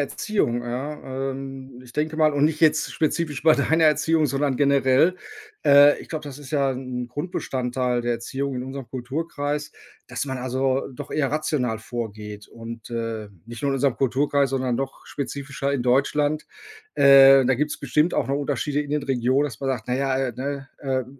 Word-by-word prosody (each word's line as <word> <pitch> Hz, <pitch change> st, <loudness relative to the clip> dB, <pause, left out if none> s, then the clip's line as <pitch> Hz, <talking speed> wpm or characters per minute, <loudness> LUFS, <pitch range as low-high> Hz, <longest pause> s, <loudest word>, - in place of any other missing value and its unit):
Erziehung, 140 Hz, -, -1 dB
ja, 135 Hz, +1 st, -4 dB
ähm, 135 Hz, -1 st, -8 dB
ich 125 Hz, -1 st, -15 dB
denke 155 Hz, +1 st, -1 dB
mal 155 Hz, -2 st, +4 dB
und 145 Hz, -, +3 dB
nicht 155 Hz, +1 st, +1 dB
jetzt 160 Hz, -2 st, +3 dB
spezifisch 155 Hz, -2 st, -1 dB
bei 160 Hz, -1 st, +6 dB
deiner 160 Hz, +3 st, +2 dB
Erziehung, 155 Hz, +1 st, +3 dB
sondern 140 Hz, -1 st, 0 dB
generell. 140 Hz, +4 st, +3 dB, 0.5 s
Äh, 145 Hz, +1 st, +7 dB
ich -, -, -13 dB
glaube, 155 Hz, -2 st, -4 dB
das 140 Hz, -1 st, -8 dB
ist 140 Hz, -3 st, -11 dB
ja 140 Hz, -2 st, +1 dB
'n 125 Hz, -1 st, -5 dB
Grundbestandteil 125 Hz, -6 st, -2 dB
der 120 Hz, 0 st, 0 dB
Erziehung 135 Hz, +4 st, -3 dB
in 125 Hz, -, -3 dB
unserem 135 Hz, -1 st, -7 dB
Kulturkreis, 145 Hz, +3 st, -3 dB, 0.4 s
dass 120 Hz, +3 st, -3 dB
man 130 Hz, -1 st, -3 dB
also 130 Hz, +1 st, 0 dB
doch 145 Hz, +3 st, -9 dB
eher 140 Hz, -3 st, 0 dB
rational 140 Hz, -7 st, -1 dB
vorgeht 105 Hz, -3 st, -7 dB
und 115 Hz, 0 st, -9 dB
äh, 115 Hz, -3 st, -4 dB, 0.2 s
nicht 120 Hz, +3 st, -9 dB
nur 140 Hz, -, +1 dB
in 135 Hz, -, 0 dB
unserem 135 Hz, -1 st, +1 dB
Kulturkreis, 140 Hz, +2 st, +1 dB
sondern 130 Hz, -2 st, 0 dB
noch 135 Hz, +2 st, -5 dB
spezifischer 140 Hz, 0 st, -4 dB
in 135 Hz, -, 0 dB
Deutschland. 145 Hz, +4 st, +1 dB, 0.5 s
Äh, 135 Hz, -1 st, +8 dB
da 130 Hz, -, +3 dB
gibt's 150 Hz, +3 st, -2 dB
bestimmt 150 Hz, +5 st, +1 dB
auch -, -, 0 dB
noch 140 Hz, -, +1 dB
Unterschiede 145 Hz, +1 st, -1 dB
in 145 Hz, -, -9 dB
den 150 Hz, -1 st, 0 dB
Regionen, 130 Hz, +2 st, +1 dB
dass 125 Hz, -6 st, -5 dB
man 135 Hz, -, -1 dB
sagt: 120 Hz, -5 st, -3 dB
„Na 125 Hz, -, +1 dB
ja, 135 Hz, -1 st, 0 dB
äh, 130 Hz, -2 st, -1 dB
ne, 140 Hz, 0 st, -4 dB
äh, 130 Hz, -2 st, -1 dB
135 Hz, 185 wpm, -24 LUFS, 125-145 Hz, 0.5 s, Äh